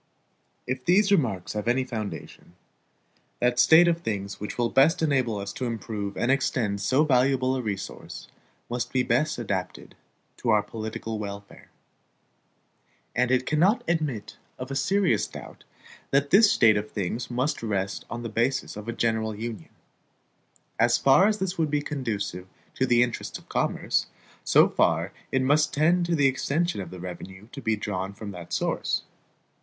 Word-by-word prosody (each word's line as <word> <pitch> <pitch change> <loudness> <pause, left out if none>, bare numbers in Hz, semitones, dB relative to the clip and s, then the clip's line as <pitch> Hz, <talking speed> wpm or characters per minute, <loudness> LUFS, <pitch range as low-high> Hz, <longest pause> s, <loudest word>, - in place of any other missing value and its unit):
If 130 0 -3
these 200 +3 +4
remarks 115 - +1
have 105 +1 -4
any 125 +2 +2
foundation, 110 -7 -7 0.8
that 125 0 +1
state 160 +6 +7
of 170 0 +1
things 100 - -4
which 105 - -6
will 120 -1 0
best 160 +6 +4
enable 130 -8 +1
us 100 0 -5
to 130 - -4
improve 105 -3 -4
and 120 - +1
extend 125 -7 0
so 130 +8 +3
valuable 130 -1 +2
a 130 - -2
resource 100 -4 -6 0.4
must 120 +1 -3
be 130 -1 +2
best 130 +6 +1
adapted 95 -6 -4 0.4
to 120 - -3
our 105 -2 +4
political 110 0 -5
welfare. 100 -1 -8 1.5
And 125 0 +2
it 130 0 +2
cannot 180 +9 +2
admit 150 -11 -2 0.2
of 130 +1 -7
a - - -3
serious 180 - +2
doubt, - - -11 0.4
that 140 +1 +1
this 210 +1 +7
state 110 - +5
of 105 +1 -3
things 110 +5 -3
must 130 +4 -1
rest 100 -3 -2
on 120 +1 -5
the - - -3
basis 120 +4 -1
of 105 +1 -8
a 120 - -2
general 110 -2 0
Union. 110 -5 -6 1.1
As 120 +1 +4
far 135 +9 +5
as 215 0 +1
this 190 -3 -3
would 160 -2 +1
be 145 0 0
conducive 105 -10 -4 0.3
to 130 - 0
the 120 0 +5
interests 120 -2 -4
of - - -19
commerce, - - 0 0.4
so - - +5
far - - +1 0.2
it 130 -1 +1
must 150 +3 +2
tend 170 +4 +3
to 170 - +1
the 145 -3 +3
extension 145 - 0
of 90 - -7
the 90 - -9
revenue 95 +3 -9
to 140 - -8
be 110 -3 +1
drawn 100 -2 -4
from 100 0 -7
that 90 -3 -10
source. - - -1
120 Hz, 165 wpm, -26 LUFS, 105-140 Hz, 1.5 s, state